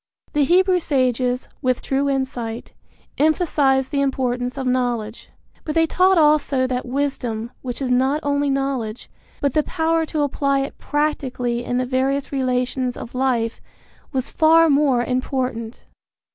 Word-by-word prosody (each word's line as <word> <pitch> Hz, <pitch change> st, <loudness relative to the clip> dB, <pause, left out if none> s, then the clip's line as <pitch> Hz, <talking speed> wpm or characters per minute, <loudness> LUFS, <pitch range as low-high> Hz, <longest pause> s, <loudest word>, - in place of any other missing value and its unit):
The 295 Hz, -1 st, +3 dB
Hebrew 365 Hz, +3 st, +4 dB
sages, 255 Hz, -4 st, 0 dB
with 255 Hz, -1 st, 0 dB
true 275 Hz, +1 st, 0 dB
insight, 245 Hz, -4 st, -3 dB, 0.5 s
emphasized 290 Hz, -4 st, +2 dB
the 280 Hz, -, +1 dB
importance 250 Hz, -2 st, -1 dB
of 265 Hz, -, -3 dB
knowledge; 245 Hz, -3 st, -1 dB, 0.3 s
but 305 Hz, -, -4 dB
they 325 Hz, 0 st, +4 dB
taught 370 Hz, +3 st, +3 dB
also 295 Hz, -4 st, +3 dB
that 255 Hz, -1 st, -2 dB
wisdom, 245 Hz, -4 st, -2 dB
which 255 Hz, +1 st, -4 dB
is 255 Hz, -, -1 dB
not 265 Hz, +4 st, +2 dB
only 285 Hz, 0 st, +1 dB
knowledge, 270 Hz, -5 st, -2 dB, 0.3 s
but 280 Hz, -2 st, +1 dB
the 305 Hz, -, +3 dB
power 325 Hz, 0 st, 0 dB
to 305 Hz, -1 st, -1 dB
apply 275 Hz, -1 st, 0 dB
it 275 Hz, -, -6 dB
practically 255 Hz, -5 st, -1 dB
in 245 Hz, -, -2 dB
the 255 Hz, -, 0 dB
various 265 Hz, +2 st, -1 dB
relations 255 Hz, -1 st, -1 dB
of 230 Hz, -, -8 dB
life, 250 Hz, -3 st, 0 dB, 0.5 s
was 265 Hz, 0 st, -2 dB
far 325 Hz, 0 st, +5 dB
more 275 Hz, -4 st, +3 dB
important. 255 Hz, -2 st, -3 dB
265 Hz, 145 wpm, -21 LUFS, 250-290 Hz, 0.5 s, far